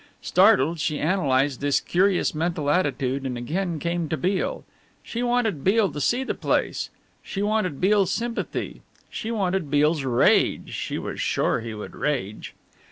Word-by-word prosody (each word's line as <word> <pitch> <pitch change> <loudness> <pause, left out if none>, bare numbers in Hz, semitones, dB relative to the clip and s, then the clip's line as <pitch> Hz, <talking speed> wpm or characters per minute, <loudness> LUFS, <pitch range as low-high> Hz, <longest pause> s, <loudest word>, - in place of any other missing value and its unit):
Startled, 160 +6 +4
she 150 0 -1
analysed 145 -6 +1
this 145 -1 +2
curious 185 +1 +1
mental 155 -2 -1
attitude 140 -5 0
and 130 -2 -3
again 170 +8 -2
came 170 0 -2
to 160 - -1
Beale. 195 - -1 0.4
She 235 - -4
wanted 240 - 0
Beale 200 -1 +3
to 145 +1 -5
see 245 - +1
the - - -2
place. - - -1 0.3
She 195 - -4
wanted 210 -8 0
Beale's 195 0 +3
sympathy. 235 +3 -3 0.3
She 220 - -4
wanted 190 -7 -1
Beale's 150 +1 +2
rage 125 -3 +2
she - - -3
was - - -5
sure - - +1
he 115 -1 -6
would 105 - -8
rage. 120 -9 -3
165 Hz, 155 wpm, -24 LUFS, 140-195 Hz, 0.4 s, Startled